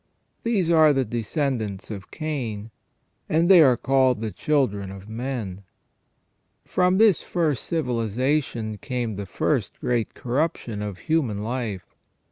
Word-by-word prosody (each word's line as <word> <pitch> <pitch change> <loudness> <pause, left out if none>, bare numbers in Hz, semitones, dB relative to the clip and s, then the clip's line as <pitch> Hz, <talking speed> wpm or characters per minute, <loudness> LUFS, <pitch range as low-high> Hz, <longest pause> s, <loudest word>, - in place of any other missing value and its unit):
These 200 -8 +1
are 155 -2 +6
the 135 -2 +1
descendants 115 - -2
of 100 -3 -7
Cain, 120 -9 -4 0.6
and 165 +2 +3
they 185 -3 +9
are 130 -5 +5
called 130 -2 +2
the 110 -1 -3
children 105 -11 0
of 95 +1 -10
men. 110 -5 -4 1.0
From 180 +1 +2
this 215 -4 +5
first 160 -7 -1
civilization 120 -4 -1
came 125 -6 -3
the 100 0 -5
first - - -1
great 120 -3 -1
corruption 125 -4 -2
of 105 -3 -4
human 125 -10 0
life. 115 -5 -4
125 Hz, 125 wpm, -24 LUFS, 105-155 Hz, 1.0 s, they